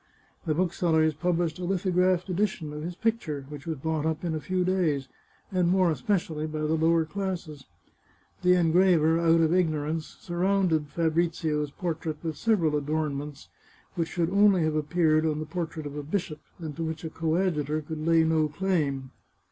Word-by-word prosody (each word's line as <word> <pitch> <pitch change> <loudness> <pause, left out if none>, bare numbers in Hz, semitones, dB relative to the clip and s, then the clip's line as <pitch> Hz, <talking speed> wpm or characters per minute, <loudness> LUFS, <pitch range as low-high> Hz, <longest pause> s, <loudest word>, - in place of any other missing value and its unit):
The 155 - +1
booksellers 165 -3 +2
published 170 +1 -1
a - - -5
lithographed 185 0 +1
edition 180 -5 -1
of 150 - -6
his 175 +3 -5
picture, 180 -11 -2
which 150 +1 -9
was 160 -2 -2
bought 160 +2 -2
up 160 +1 -2
in 165 - -1
a 155 - -2
few 185 +1 -1
days, 165 -8 +1 0.4
and 180 -2 +2
more 185 -2 +3
especially 155 +1 -1
by 155 0 -4
the 155 +1 0
lower 160 0 +3
classes. 175 -6 -5 0.8
The 180 0 +5
engraver, 170 -2 +4
out 165 0 +4
of 160 +1 +3
ignorance, 155 -3 -1
sur 175 -1 -6
rounded 180 -5 +2
Fabrizio's 160 -2 0
portrait 160 0 -4
with 160 -2 -3
several 170 -5 +1
adornments, 150 -1 -3 0.4
which 165 -2 -2
should 175 -1 -1
only 200 -3 +5
have 155 -1 +1
appeared 155 +1 +2
on 155 -2 0
the 155 - -4
portrait 160 -1 -4
of 145 0 -6
a 150 - -3
bishop, 155 0 -3 0.2
and 155 -4 -6
to 165 - -2
which 160 0 -4
a 160 - -5
coadjutor 160 -2 0
could 155 0 -6
lay 165 0 +4
no 160 -1 +2
claim. 150 -6 -1
160 Hz, 170 wpm, -27 LUFS, 155-180 Hz, 0.8 s, The